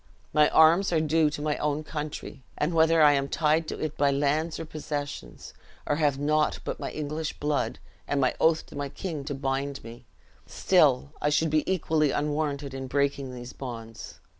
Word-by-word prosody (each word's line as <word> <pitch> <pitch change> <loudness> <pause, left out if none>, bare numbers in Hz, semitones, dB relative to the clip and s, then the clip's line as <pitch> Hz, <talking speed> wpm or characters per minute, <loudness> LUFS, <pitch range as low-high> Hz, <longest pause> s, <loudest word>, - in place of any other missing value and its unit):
My 150 0 +5
arms 165 +5 +5
are 165 - +3
due 155 0 +2
to 145 0 -5
my 150 -1 0
own 150 +1 -1
country; 150 -3 -6 0.2
and 150 +4 0
whether 160 0 +4
I 150 - +8
am 140 -1 +1
tied 155 0 +1
to - - -4
it 155 -1 -3
by 145 - +3
lands 145 +4 0
or 165 - -5
possessions, 145 - -6 0.3
or 145 - 0
have 145 -4 +2
naught 150 +2 +1
but - - -4
my - - -4
English 155 +1 -4
blood 145 0 -1 0.3
and 145 - 0
my 130 -2 +2
oath 160 0 +3
to - - -13
my 140 -1 -3
king 155 -1 -5
to 145 -1 -3
bind 135 +1 -3
me, 120 +2 -11 0.4
still 70 +2 +3
I 150 - +2
should 150 +1 +1
be 155 +4 +1
equally 160 -4 +1
unwarranted 145 -1 -2
in 135 0 -5
breaking 140 -1 0
these 125 0 -8
bonds. 115 -4 -8
150 Hz, 190 wpm, -27 LUFS, 140-155 Hz, 0.4 s, I